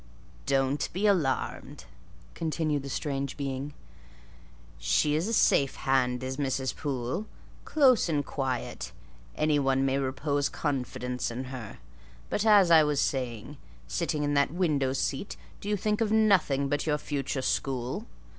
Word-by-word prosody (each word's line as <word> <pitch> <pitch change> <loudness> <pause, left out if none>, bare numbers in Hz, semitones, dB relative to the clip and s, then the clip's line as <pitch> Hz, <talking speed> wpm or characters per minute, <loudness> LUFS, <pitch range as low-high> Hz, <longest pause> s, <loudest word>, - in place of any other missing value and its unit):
"Don't 135 +1 +1
be 190 +4 -1
alarmed," 170 -10 0 0.5
continued 155 -2 -1
the 140 - -7
strange 140 -1 -3
being; 140 0 -4 1.0
"she's 150 - +2
a - - -1
safe 140 - +3
hand 130 -2 +1
is 130 0 -4
Mrs. 130 -2 -1
Poole: 135 - -3 0.4
close 260 - +4
and 145 -3 0
quiet; 130 -4 -3 0.4
any 150 -1 +2
one 135 -1 +2
may 135 0 +1
repose 140 +2 -1
confidence 125 -3 -2
in 120 +2 -4
her. 115 -5 -7 0.5
But, 210 +2 0
as 200 -5 +6
I 160 -2 +8
was 150 -2 +1
saying: 125 0 -2 0.3
sitting 160 -3 -1
in 145 0 0
that 140 0 +3
window 150 -7 +1
seat, 140 +6 -2 0.2
do 205 - -6
you 210 - +1
think 210 +3 0
of 215 -2 +1
nothing 190 -11 +3
but 145 +3 -1
your 150 -1 +2
future 140 -2 -3
school? 130 -2 -2
140 Hz, 140 wpm, -28 LUFS, 130-160 Hz, 1.0 s, I